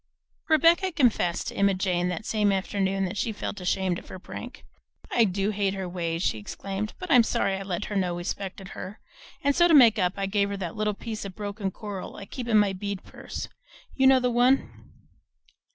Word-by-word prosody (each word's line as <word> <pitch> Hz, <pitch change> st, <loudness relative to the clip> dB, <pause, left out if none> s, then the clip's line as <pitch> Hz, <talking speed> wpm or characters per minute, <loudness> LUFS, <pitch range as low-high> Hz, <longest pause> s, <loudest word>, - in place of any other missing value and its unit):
Rebecca 335 Hz, +4 st, +4 dB
confessed 240 Hz, -, +1 dB
to -, -, -9 dB
Emma 200 Hz, -1 st, +3 dB
Jane 180 Hz, -2 st, 0 dB
that 180 Hz, +4 st, -4 dB
same 210 Hz, -2 st, +2 dB
afternoon 195 Hz, 0 st, 0 dB
that 190 Hz, +3 st, -4 dB
she 220 Hz, +3 st, 0 dB
felt 205 Hz, -2 st, -5 dB
ashamed 180 Hz, 0 st, 0 dB
of -, -, -16 dB
her -, -, -8 dB
prank. 240 Hz, +6 st, -9 dB, 0.5 s
"I 235 Hz, -, +4 dB
do 195 Hz, +1 st, 0 dB
hate 200 Hz, -1 st, 0 dB
her 190 Hz, -1 st, -4 dB
ways," 170 Hz, -1 st, -2 dB
she 110 Hz, -, 0 dB
exclaimed, 195 Hz, -, -5 dB
"but 365 Hz, -2 st, -6 dB
I'm 250 Hz, -4 st, +8 dB
sorry 195 Hz, -3 st, 0 dB
I 190 Hz, -, -5 dB
let 195 Hz, 0 st, -3 dB
her 205 Hz, -, -5 dB
know 180 Hz, -3 st, 0 dB
we 175 Hz, -, -5 dB
'spected 195 Hz, +1 st, -5 dB
her; 200 Hz, +4 st, -8 dB, 0.4 s
and 285 Hz, 0 st, +2 dB
so 345 Hz, 0 st, +6 dB
to 330 Hz, -, +5 dB
make 235 Hz, -6 st, +7 dB
up, 180 Hz, -1 st, +2 dB
I 195 Hz, -, -1 dB
gave 200 Hz, 0 st, +1 dB
her 200 Hz, -, -3 dB
that 175 Hz, -4 st, -5 dB
little 210 Hz, -1 st, -1 dB
piece 220 Hz, 0 st, -6 dB
of 195 Hz, -2 st, -7 dB
broken 205 Hz, -1 st, -3 dB
coral 200 Hz, -1 st, -7 dB
I 200 Hz, -, -8 dB
keep 240 Hz, +4 st, -6 dB
in 220 Hz, -2 st, +4 dB
my 205 Hz, -2 st, +3 dB
bead 200 Hz, 0 st, -5 dB
purse; -, -, -7 dB, 0.5 s
you 265 Hz, 0 st, +4 dB
know 265 Hz, -1 st, +7 dB
the 250 Hz, -1 st, +1 dB
one?" 245 Hz, +3 st, +1 dB
200 Hz, 215 wpm, -26 LUFS, 190-225 Hz, 0.5 s, I'm